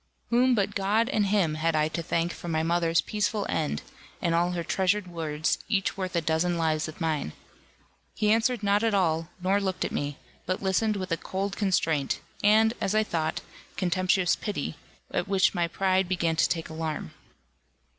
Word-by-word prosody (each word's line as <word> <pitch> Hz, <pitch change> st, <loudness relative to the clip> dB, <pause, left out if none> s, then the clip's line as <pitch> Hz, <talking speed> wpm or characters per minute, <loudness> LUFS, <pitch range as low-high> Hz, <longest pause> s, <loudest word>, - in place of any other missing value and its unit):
Whom 250 Hz, +1 st, +4 dB
but 205 Hz, -1 st, 0 dB
God 210 Hz, +4 st, +1 dB
and 210 Hz, -6 st, +1 dB
him 190 Hz, -6 st, +2 dB
had 160 Hz, +1 st, 0 dB
I 155 Hz, 0 st, +3 dB
to 170 Hz, -, -3 dB
thank 165 Hz, +2 st, -1 dB
for -, -, -9 dB
my 160 Hz, -1 st, 0 dB
mother's 170 Hz, 0 st, +2 dB
peaceful 210 Hz, 0 st, -1 dB
end, 150 Hz, -, -1 dB, 0.4 s
and 170 Hz, -, 0 dB
all 175 Hz, +1 st, +2 dB
her 170 Hz, -1 st, -2 dB
treasured 190 Hz, +3 st, +1 dB
words, 160 Hz, -3 st, -2 dB
each 195 Hz, -3 st, +1 dB
worth 185 Hz, -2 st, -4 dB
a 170 Hz, -, +2 dB
dozen 160 Hz, +2 st, +1 dB
lives 155 Hz, -2 st, 0 dB
of 155 Hz, -, -9 dB
mine? 155 Hz, -, -1 dB, 0.8 s
He 210 Hz, 0 st, +2 dB
answered 230 Hz, 0 st, +2 dB
not 200 Hz, +1 st, +3 dB
at 225 Hz, -2 st, +2 dB
all, 165 Hz, -3 st, +1 dB
nor 195 Hz, +2 st, +2 dB
looked 190 Hz, -2 st, -1 dB
at -, -, -3 dB
me; 145 Hz, 0 st, -3 dB, 0.3 s
but 185 Hz, +1 st, 0 dB
listened 210 Hz, +3 st, +1 dB
with 185 Hz, -3 st, -4 dB
a 165 Hz, -, +2 dB
cold 195 Hz, +3 st, -3 dB
constraint, 165 Hz, -8 st, +1 dB, 0.2 s
and, 220 Hz, +2 st, +5 dB
as 195 Hz, -, 0 dB
I 215 Hz, -, +4 dB
thought, 160 Hz, -6 st, -2 dB, 0.4 s
contemptuous 185 Hz, 0 st, +2 dB
pity, 210 Hz, -, -4 dB, 0.4 s
at -, -, -1 dB
which 195 Hz, -1 st, +3 dB
my 175 Hz, -3 st, +1 dB
pride 190 Hz, +1 st, +1 dB
began 170 Hz, -3 st, +1 dB
to 165 Hz, -, +3 dB
take 165 Hz, -2 st, -2 dB
alarm. 160 Hz, -, -4 dB
180 Hz, 185 wpm, -27 LUFS, 165-200 Hz, 0.8 s, and